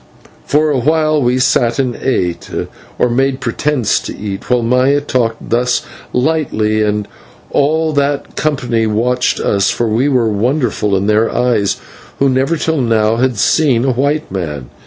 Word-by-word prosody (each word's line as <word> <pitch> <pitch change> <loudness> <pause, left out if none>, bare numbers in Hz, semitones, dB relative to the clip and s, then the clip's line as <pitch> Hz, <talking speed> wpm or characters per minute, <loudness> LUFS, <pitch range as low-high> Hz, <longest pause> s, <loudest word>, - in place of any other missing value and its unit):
For 150 +1 +2
a 135 - +1
while 155 +2 +2
we 125 0 +1
sat 120 -2 +2
and 125 -3 -1
ate, 90 -10 -2 0.5
or - - +2
made 130 +2 0
pretence 125 0 0
to - - -7
eat, 100 -2 -6
while 125 -1 +2
Maya 125 +4 +3
talked 120 -5 -2
thus 120 +1 +1 0.3
lightly 125 -7 0
and 105 -1 0 0.4
all 155 +2 +1
that 140 0 -1
company 125 -7 0
watched 120 +4 0
us, 100 0 +1
for 120 - 0
we 120 +6 +1
were 125 -4 +2
wonderful 110 -1 0
in 95 - -1
their 110 +2 +2
eyes, 120 -5 +1 0.4
who 140 - +2
never 135 +6 +1
till 160 -1 0
now 115 -2 +2
had 125 -1 0
seen 130 +2 +2
a 135 - +2
white 140 +3 -1
man. 75 -9 -5
125 Hz, 155 wpm, -15 LUFS, 110-140 Hz, 0.5 s, Maya